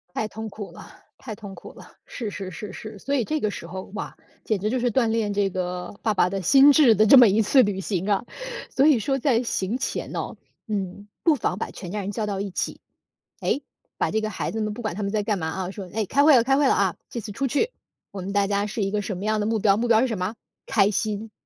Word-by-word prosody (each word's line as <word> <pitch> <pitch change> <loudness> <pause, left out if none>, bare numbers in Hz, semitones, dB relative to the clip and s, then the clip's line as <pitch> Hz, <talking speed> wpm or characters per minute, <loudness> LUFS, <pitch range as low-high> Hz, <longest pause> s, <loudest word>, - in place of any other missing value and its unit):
太 220 - 0
痛 220 +1 -6
苦 205 -1 -8
了 - - -12 0.3
太 225 -5 -7
痛 205 -2 -9
苦 - - -11
了， - - -15
是 225 -4 -5
是 195 -2 -6
是 195 +3 -7
是， 215 -1 -8
所 280 +8 -2
以 245 - +1
这 310 +6 -1
个 215 - 0
时 170 - -7
候， 185 +3 -7
哇， - - -5 0.3
简 215 -3 0
直 210 +2 0
就 255 - 0
是 245 - +1
锻 235 0 +2
炼 220 -2 0
这 200 -1 +1
个 180 -1 -4
爸 215 - 0
爸 180 - +3
的 195 0 -2
心 270 - +7
智 280 -6 +6
的 215 - +4
这 250 +5 +8
么 245 - +9
一 210 +2 +3
次 260 +6 +5
旅 200 -2 -2
行 190 0 -2
啊。 200 +1 +1 0.5
所 270 - +3
以 290 -7 +5
说 270 +5 0
在 245 -3 +2
行 220 -2 -1
前 - - -3
哦， - - -4 0.3
嗯， 200 -1 -4 0.2
不 325 -3 +5
妨 195 -7 -2
把 - - -4
全 180 -3 -8
家 210 - -3
人 200 +2 -4
叫 220 - -2
到 205 -2 -2
一 200 -1 -4
起， - - -3 0.6
哎， 280 - 0 0.4
把 - - 0
这 220 - +1
个 215 0 -2
孩 - - -3
子 220 - -3
们 215 -1 -1
不 210 - -7
管 215 -6 -3
他 210 - -4
们 200 - -1
在 210 0 -1
干 205 -4 0
嘛 160 - -2
啊。 185 +2 -4
说： 195 -2 -7
“诶， 215 -1 -1
开 280 - +3
会 290 -2 +7
了， 230 - +4
开 270 +2 +3
会 285 -2 +4
了 - - +4
啊， 190 -4 +1 0.2
这 240 - -5
次 210 -1 -7
出 270 +6 -1
去， 440 - 0 0.4
我 195 - -6
们 190 +2 -5
大 200 0 +2
家 200 0 0
是 210 0 -2
一 195 - -2
个 210 - 0
什 200 -1 -4
么 190 - -6
样 215 0 +1
的 - - 0
目 225 0 +1
标， 200 -1 +4
目 235 +3 -1
标 225 -1 +5
是 260 - +3
什 225 - -2
么 180 - 0
啊？ 220 +4 -6 0.3
开 200 -3 +3
心， 215 +1 -2
210 Hz, 300 characters per minute, -24 LUFS, 195-230 Hz, 0.6 s, 么